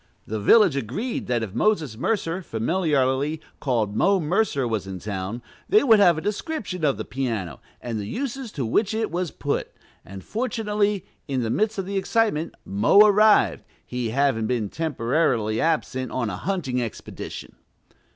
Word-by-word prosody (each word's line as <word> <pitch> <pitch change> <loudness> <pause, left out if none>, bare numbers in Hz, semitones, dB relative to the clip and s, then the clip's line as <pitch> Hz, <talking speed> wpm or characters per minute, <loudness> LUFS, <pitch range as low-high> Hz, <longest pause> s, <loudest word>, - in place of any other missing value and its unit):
The 110 0 -3
"village" 185 - +5
agreed 140 - -3
that 120 -2 0
if 100 -4 -6
Moses 155 - +1
Mercer, 175 - -1
familiarly 145 +1 0 0.2
called 115 -7 0
"Mo 195 - +3
Mercer," 160 - +1
was 110 -4 -2
in 95 -1 -5
town, 100 +4 -5 0.3
they 420 +3 +5
would 225 -6 +6
have 175 -5 +5
a - - -3
description 210 - -4
of 140 -3 +2
the - - -5
piano, 115 - -3 0.2
and 115 -3 -4
the 100 - -5
uses 265 - -4
to 135 - -2
which 210 - +1
it 220 -1 -1
was 175 0 -1
put; 145 0 -3 0.3
and, 95 0 -10
fortunately, 210 -4 -1 0.2
in 130 -4 -1
the 115 - -1
midst 215 - 0
of 195 - -2
the 200 +1 -3
excitement 195 -5 0
"Mo" 100 - +5
arrived, 210 - +4 0.2
he 125 -2 -3
having 125 -3 +1
been 115 -4 -1
temporarily 125 -6 0
absent 130 -6 -1
on 120 -5 -1
a - - -4
hunting 135 - -2
expedition. 115 -3 -7
145 Hz, 160 wpm, -24 LUFS, -, 0.3 s, would